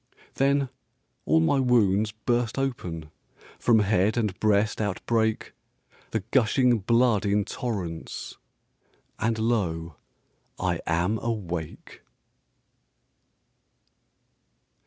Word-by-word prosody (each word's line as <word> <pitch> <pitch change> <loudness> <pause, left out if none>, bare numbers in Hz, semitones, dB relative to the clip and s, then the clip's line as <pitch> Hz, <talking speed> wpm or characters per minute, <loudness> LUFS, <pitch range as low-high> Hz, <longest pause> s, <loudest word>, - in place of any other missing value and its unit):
Then 140 0 +2 0.6
all 80 +2 +4
my 135 - +2
wounds 110 -5 +3
burst 120 +3 -1
open, 85 - -3 0.5
From 115 -3 +4
head 105 +1 +2
and 105 -5 0
breast 110 0 +2
outbreak 110 +2 -1 0.6
The 110 - -1
gushing 125 -1 +3
blood 115 +1 +3
in 100 0 +1
torrents 95 -9 -5 0.8
And 110 0 0
lo, 85 -9 -1 0.6
I 90 -3 0
am 90 +7 +1
awake! 90 -9 -5
110 Hz, 85 wpm, -26 LUFS, 95-120 Hz, 0.8 s, all